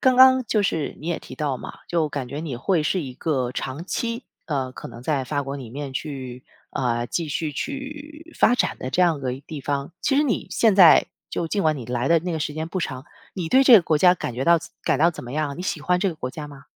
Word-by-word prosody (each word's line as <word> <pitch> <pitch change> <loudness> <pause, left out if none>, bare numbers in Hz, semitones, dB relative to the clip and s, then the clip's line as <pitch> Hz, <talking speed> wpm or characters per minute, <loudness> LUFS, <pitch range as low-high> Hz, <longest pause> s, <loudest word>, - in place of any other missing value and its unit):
刚 255 -1 +4
刚 260 0 +8
就 215 -2 +2
是 165 -6 -1
你 155 - -8
也 170 - -1
提 - - -11
到 145 -4 -2
嘛， - - -9
就 165 -3 0
感 140 -4 -4
觉 145 - -4
你 150 -7 -4
会 165 +5 +1
是 175 +4 0
一 130 -3 -6
个 130 -4 -1
长 135 +5 -4
期， 230 +5 -3 0.2
呃， 135 -4 -2
可 - - -9
能 120 - -11
在 140 -1 0
法 145 +2 -1
国 140 +1 -5
里 125 -5 -8
面 140 +1 -6
去 130 -3 -6 0.3
呃， 120 -2 -1
继 165 +2 -2
续 150 +1 -2
去 295 - -6
发 245 - +5
展 - - 0
的 130 - -5
这 185 - +1
样 170 -5 +3
个 130 -2 -2
地 155 -3 -6
方。 140 +2 -3
其 290 - +2
实 295 - +5
你 250 - -1
现 220 -4 +3
在 180 -5 +8 0.2
就 170 - -2
尽 200 +2 0
管 155 -1 +2
你 130 - -6
来 125 +1 -1
的 165 0 +5
那 175 +2 -4
个 160 - -2
时 150 - -2
间 160 +2 -4
不 185 - -3
长， 130 -3 -4 0.3
你 175 -4 -3
对 265 +7 +5
这 255 -3 +9
个 205 - +9
国 160 -1 +2
家 180 +3 +6
感 125 -8 -5
觉 130 +3 -2
到 170 +2 +5 0.2
感 - - +1
到 170 +3 +5
怎 - - -9
么 120 - -7
样？ 150 -1 -2
你 180 - -5
喜 160 - -2
欢 180 +3 +1
这 195 - +2
个 - - -7
国 130 -4 -4
家 150 +2 -7
吗？ 140 -1 -13
155 Hz, 285 characters per minute, -23 LUFS, 135-180 Hz, 0.3 s, 这